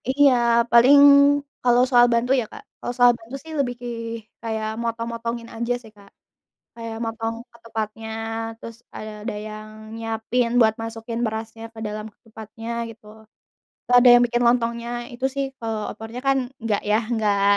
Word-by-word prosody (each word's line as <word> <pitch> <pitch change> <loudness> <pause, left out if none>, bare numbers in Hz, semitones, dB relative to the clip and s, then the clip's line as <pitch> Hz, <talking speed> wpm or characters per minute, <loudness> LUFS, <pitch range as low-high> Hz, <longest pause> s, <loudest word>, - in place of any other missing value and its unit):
Iya, 275 0 +5 0.4
paling 245 +5 +7 0.7
kalau 245 0 +4
soal 245 -2 +6
bantu 235 +2 +1
ya - - -5
Kak, 430 - -11 0.2
kalau 245 - -4
soal 245 -1 +6
bantu 230 +4 -10
sih 320 - -10
lebih 250 -3 0
ki 245 - -6 0.5
kayak 220 -1 -3
motong-motongin 230 0 -4
aja 235 +2 -1
sih 220 -2 -15
Kak, 200 -1 -17 0.7
kayak 230 -1 -6
motong 225 0 -3 0.2
ke - - -18
tempatnya 220 -1 -5 0.5
terus 230 0 -10 0.2
ada 215 0 -6
ada 210 - -4
yang 215 0 -8 0.3
nyiapin 225 +2 -1
buat 220 -2 +5
masukin 225 +1 -5
berasnya 225 0 -5
ke 225 - -11
dalam 210 0 -5 0.2
tempatnya 225 0 -10 0.2
gitu, 225 -1 -14 0.9
ada 245 +1 +6
yang 245 0 +7
bikin 240 0 0
lontongnya 235 -1 +1 0.2
itu 245 +2 -7
sih 275 0 -1 0.2
kalau 225 -2 -3
opornya 225 +3 -8
kan 270 0 +4 0.2
enggak 215 -3 0
ya 210 - +5
enggak 210 -4 +1
230 Hz, 155 wpm, -23 LUFS, 220-240 Hz, 0.9 s, paling